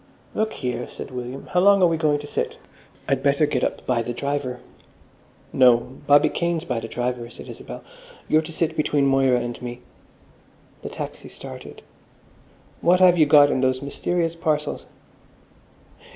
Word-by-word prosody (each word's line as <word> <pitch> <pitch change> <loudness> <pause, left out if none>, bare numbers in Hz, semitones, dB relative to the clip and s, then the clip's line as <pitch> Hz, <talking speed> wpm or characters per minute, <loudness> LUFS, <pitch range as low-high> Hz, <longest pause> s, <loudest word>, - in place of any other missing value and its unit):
"Look 220 0 -1
here," 125 -2 -4
said - - -9
William, 125 +2 -6
"how 180 0 +3
are 200 -2 +6
we 165 -1 +2
going 155 -2 +1
to 145 - -8
sit? - - -3 0.5
I'd 135 -1 +1
better 140 +2 +3
get 145 -4 -1
up - - -2
by 125 -2 +1
the 120 +1 -4
driver." 140 -2 -3 0.9
"No, 125 -2 +6 0.3
Bobby 145 0 +6
Kane's 170 -1 -1
by 125 -8 -2
the 115 - -6
driver," 120 0 -3
said - - -11
Isabel. - - -9 0.4
"You're 155 - +4
to 160 - -8
sit 160 0 -1
between 150 -2 +1
Moira 135 -2 +3
and 120 0 -5
me." 120 0 -7 1.0
The - - -6
taxi - - -7
started. - - -10 1.0
"What 180 +2 +4
have 180 -1 +6
you 155 - +5
got 145 -1 +7
in 130 - 0
those 130 0 +1
mysterious 165 +4 -1
parcels?" 155 -3 -2
140 Hz, 160 wpm, -23 LUFS, 125-160 Hz, 1.0 s, got